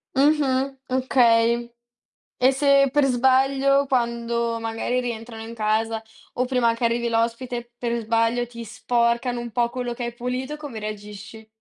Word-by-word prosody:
Mh-mh, 275 -2 +2
okay. 235 -2 +3 0.7
E 260 +1 +6
se 275 0 +4
per 290 0 +3
sbaglio, 270 +2 +3
quando 235 -2 -1
magari 225 +2 -2
rientrano 225 -2 -6
in 230 +1 -8
casa 220 +1 0 0.3
o 250 +1 0
prima 250 -3 +2
che 235 +1 -3
arrivi 235 0 0
l'ospite, 235 +1 -2
per 235 -1 -3
sbaglio 230 +2 +1
ti 235 -1 -9
sporcano 240 +2 0
un 235 -1 -6
po' 240 0 +1
quello 245 0 -4
che 240 0 -5
hai 235 0 -5
pulito, 255 +4 -4
come 290 -7 -8
reagisci? 210 +1 -8
240 Hz, 145 wpm, -23 LUFS, 230-260 Hz, 0.7 s, E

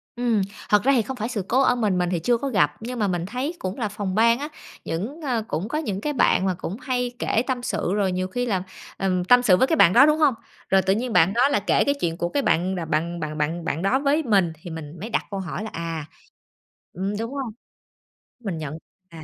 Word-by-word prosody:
Ừm, 240 -4 +1 0.3
thật 210 -1 +4
ra 275 - +4
thì 240 - +4
không 255 +4 -6
phải 220 +2 -3
sự 220 -5 -2
cố 260 +3 +3
ở 250 - +4
mình, 210 -6 +1
mình 180 -1 +1
thì 175 -2 0
chưa 235 +9 +2
có 280 - -3
gặp, 150 - +2
nhưng 240 +2 -5
mà 205 - +2
mình 175 -2 -1
thấy 255 - -3
cũng 185 +1 -4
là 220 -5 -1
phòng 200 -3 -4
ban 230 +3 +4
á, 295 +2 -4 0.4
những, 230 - -4
ơ 245 -6 -1
cũng 165 +7 -2
có 300 - -2
những 205 -11 -3
cái 295 +5 -1
bạn 215 -6 +3
mà 185 - +1
cũng 180 +2 -6
hay 250 -1 -1
kể 225 - +1
tâm 255 -2 -2
sự 180 - -1
rồi 200 -2 +1
nhiều 185 0 -1
khi 245 +6 -2
là, 190 -6 -1 0.3
ừm, 185 -2 0
tâm 245 +7 +6
sự 190 -7 +5
với 260 - +3
cái 320 - +2
bạn 180 - +6
đó, 265 +6 +8
đúng 305 +1 +3
hông? 295 -4 +4 0.4
Rồi 190 0 +5
tự 190 +1 +2
nhiên 235 +2 -2
bạn 175 +4 +4
đó 250 +5 +4
là 285 - +2
kể 205 - +2
cái 280 - +2
chuyện 165 0 -1
của 175 - -1
cái 280 +9 0
bạn 185 -1 +1
bạn 170 +2 -1
bạn 155 -1 -4
bạn 160 +3 -1
bạn 160 +2 -2
đó 240 +8 +2
với 290 +3 +2
mình 195 - +2
thì 175 - -8
mình 160 0 -8
mới 215 - -6
đặt - - 0
câu 195 - -3
hỏi 190 +2 -4
là 220 - -5
à, 165 -2 -4 0.9
ừm, 195 +4 -3
đúng 230 +4 -4
hông? 265 -5 -4 0.9
Mình 200 -8 -4
nhận 155 -3 -5
thấy 155 - -7 0.4
là, - - -9
205 Hz, 260 wpm, -24 LUFS, 180-245 Hz, 0.9 s, đó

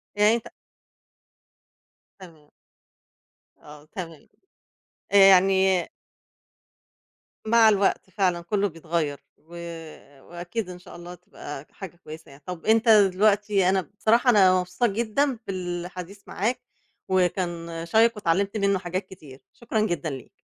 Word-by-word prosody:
يعني 210 +2 +4
أنت 235 - -6 1.7
تمام. 160 -5 -16 1.1
آه، 150 0 -15
تمام. 165 -3 -9 0.8
آآ، 200 - +4
يعني 190 -2 +5 1.6
مع 225 0 +6
الوقت 200 -2 0
فعلًا 185 -3 0
كلّه 200 +4 -1
بيتغيّر، 160 -3 -3 0.2
و 160 - -27 0.7
وأكيد 175 +4 -6
إن 180 -1 -9
شاء 180 - -14
الله 175 +1 -10
تبقى 145 -4 -10
حاجة 185 -4 -10
كويسة 155 -2 -12
يعني. 140 +1 -17
طَب 180 -2 -8
أنت 225 +1 +3
دلوقتي 205 -1 +3
أنا 190 0 +2 0.2
بصراحة 235 +4 +3
أنا 190 -5 +5
مبسوطة 180 +7 -1
جدًا 235 +4 -1
بالحديث 180 +1 -6
معاك، 235 +6 -2 0.5
وكان 175 -3 -1
شيّق 225 +6 +4
واتعلمت 200 +2 -1
منّه 200 -1 +1
حاجات 185 +1 -4
كتير، 145 -8 -14
شكرًا 235 -2 -3
جدًا 175 -7 -2
ليك. 130 -3 -10
185 Hz, 115 wpm, -24 LUFS, 170-205 Hz, 1.7 s, مع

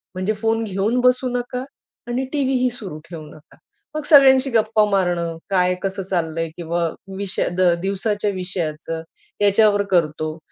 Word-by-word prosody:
म्हणजे 185 +3 -1
फोन 225 +1 0
घेऊन 210 +4 0
बसू 250 +1 +3
नका 245 +1 -3 0.4
आणि 245 +2 -1
टीव्हीही 260 -3 +1
सुरू 210 -10 -8
ठेवू 165 -3 -8
नका. 150 0 -17 0.4
मग 305 - -2
सगळ्यांशी 270 -2 +6
गप्पा 220 -1 +3
मारणं, 175 -4 0
काय 180 -1 +2
कसं 195 0 -2
चाललंय? 165 -3 -2
किंवा 170 0 -1 0.3
विषय 195 -1 -1
द 185 - +2 0.2
दिवसाच्या 205 +2 -1
विषयाचं, 165 -4 -3 0.4
याच्यावर 205 0 +4
करतो 155 -2 0
195 Hz, 135 wpm, -21 LUFS, 175-235 Hz, 0.4 s, सगळ्यांशी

